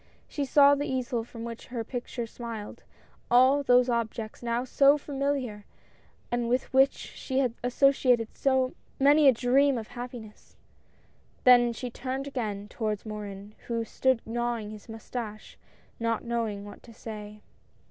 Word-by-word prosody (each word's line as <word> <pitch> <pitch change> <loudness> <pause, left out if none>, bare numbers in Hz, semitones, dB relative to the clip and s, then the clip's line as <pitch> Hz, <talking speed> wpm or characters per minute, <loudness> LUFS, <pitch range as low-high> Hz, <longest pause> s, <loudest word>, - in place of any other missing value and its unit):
She 285 - -3
saw 280 +1 +6
the 285 0 -1
easel 250 -3 -2
from 230 0 -9
which 230 -1 -7
her 240 -2 -4
picture 240 0 -5
smiled, 225 -2 -8 0.5
all 260 +4 +5
those 250 -2 +4
objects 230 -2 -3
now 235 0 -1
so 275 +3 +4
familiar, 275 -7 -3 0.7
and 240 -1 0
with 250 +2 -1
which 270 +1 +5
she 260 - -6
had 255 -4 +2
associated 250 -2 +3 0.7
many 290 +2 +6
a - - +9
dream 260 +3 +3
of 220 -2 -6
happiness; 240 -3 -9 0.4
— - - -35
then 245 -1 +6
she 245 +1 -6
turned 260 +3 -4
again 215 -7 -4
toward 215 -1 -3
Morin, 205 -1 -7
who 230 -1 -1
stood 260 0 +1
gnawing 235 -2 -2
his 215 +2 -12
moustache, 225 -1 -7 0.4
not 230 -1 -1
knowing 225 -4 -2
what 205 - -11
to 230 - -15
say. 210 -2 -9
240 Hz, 145 wpm, -28 LUFS, 225-260 Hz, 0.7 s, a